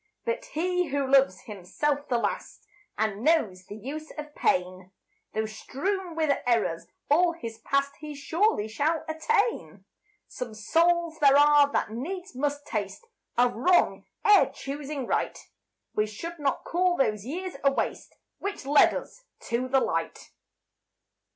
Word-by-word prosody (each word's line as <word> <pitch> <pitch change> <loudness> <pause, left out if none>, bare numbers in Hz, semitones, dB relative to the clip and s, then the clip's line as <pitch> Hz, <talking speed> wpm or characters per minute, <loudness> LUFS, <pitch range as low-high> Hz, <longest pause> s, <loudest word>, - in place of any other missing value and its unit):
But - - -2
he 360 +2 0
who 280 -1 -1
loves 265 -8 +4
himself 280 +9 -3
the 245 - +2
last 345 - -3 0.3
And 215 0 -1
knows 215 - +2
the 205 - -9
use 295 +8 -7
of 300 0 -7
pain, 185 -3 0 0.5
Though 220 0 0
strewn 345 - -3
with 310 -3 +2
errors 225 -9 +1 0.2
all 340 +4 +4
his 230 -8 -8
past, 275 +3 0
He 300 -1 -7
surely 320 - +1
shall 295 +9 -1
attain. 410 +9 -1 0.4
Some 240 -3 -7
souls 330 +8 +2
there 280 -1 +6
are 290 -1 +6
that - - 0
needs 350 - -5
must 290 +2 -2
taste 210 - -4 0.3
Of 245 0 +4
wrong, 350 +11 +2 0.2
ere 415 -1 +7
choosing 280 -1 -5
right; - - -1 0.6
We 210 0 +1
should 335 +11 -7
not 280 -2 -1
call 355 +1 +1
those 210 -6 +1
years 350 - -5
a 275 - +5
waste - - -3 0.2
Which 400 -7 -5
led 285 +1 +5
us - - -8 0.3
to 245 +2 0
the 265 +1 +3
light. - - -3
285 Hz, 145 wpm, -27 LUFS, 230-335 Hz, 0.6 s, ere